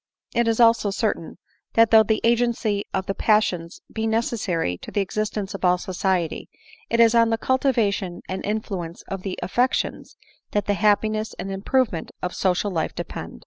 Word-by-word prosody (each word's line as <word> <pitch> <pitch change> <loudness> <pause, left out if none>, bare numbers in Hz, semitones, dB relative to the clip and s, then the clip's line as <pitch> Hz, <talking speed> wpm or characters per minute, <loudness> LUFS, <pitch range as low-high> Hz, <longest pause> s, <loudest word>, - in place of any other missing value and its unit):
It 235 0 +2
is 225 0 +1
also 230 -3 +5
certain, 195 -6 -2 0.4
that 230 -1 +5
though 220 -1 +8
the 220 0 +1
agency 230 -3 +1
of 190 - -2
the 195 - -2
passions 190 -6 +1
be 220 0 -1
necessary 200 - -1
to - - -9
the - - -1
existence 210 0 -3
of 195 - -7
all 180 0 +4
society, 180 -2 -2 0.4
it 230 - +1
is 230 -1 +6
on 230 -1 +5
the 225 - +1
cultivation 225 -9 0
and 190 0 -4
influ 205 -3 -3
ence 165 +1 -9
of 195 -1 -6
the 190 -1 -4
affections 245 +7 -1 0.4
that 205 - +1
the 205 - +1
happiness 215 +2 +1
and 195 - -5
improve 225 +6 +1
ment 165 - -5
of 180 - -2
social 190 +2 0
life 160 -3 -2
depend. - - -6
210 Hz, 180 wpm, -23 LUFS, 185-225 Hz, 0.4 s, though